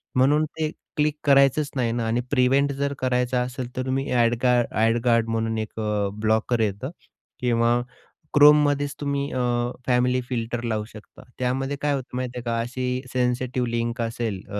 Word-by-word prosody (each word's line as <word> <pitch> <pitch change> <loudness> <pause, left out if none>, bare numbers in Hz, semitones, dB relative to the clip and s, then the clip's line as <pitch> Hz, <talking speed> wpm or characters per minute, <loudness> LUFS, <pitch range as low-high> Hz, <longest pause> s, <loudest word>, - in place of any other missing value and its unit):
म्हणून 145 +4 +4
ते 155 0 -3 0.3
क्लिक 150 0 +2
करायचंच 140 +1 +4
नाही 120 -3 0
ना 115 0 -1
आणि 120 +2 +1
प्रिव्हेंट 135 +1 +3
जर 140 +1 -2
करायचं 125 0 0
असेल, 125 0 -5
तर 130 - -2
तुम्ही 135 +1 -1
अ‍ॅड 120 -1 +3
गा 125 -1 +4 0.2
अ‍ॅड 115 +2 +2
गार्ड 115 -2 +3
म्हणून 115 0 -1
एक 110 0 -5
अ, 105 -2 0
ब्लॉकर 110 +2 +1
येतं 105 +4 -1 0.5
किंवा 120 -1 +2 0.6
Chromeमध्येच 145 -1 +5
तुम्ही 140 0 -2
अ, - - -2 0.5
फॅमिली 125 0 +2
फिल्टर 120 -1 -3
लावू 110 -2 -2
शकता. 110 -1 -14 0.2
त्यामध्ये 135 +2 -1
काय 145 0 +1
होतं 130 -2 -5
माहिती 125 -1 -4
आहे 120 - -5
का, 115 -1 -1
अशी 125 +1 -3
सेन्सिटिव्ह 125 0 0
लिंक 115 +1 -2
असेल 115 -4 -3
अ, 105 - -3
125 Hz, 170 wpm, -24 LUFS, 115-135 Hz, 0.6 s, Chromeमध्येच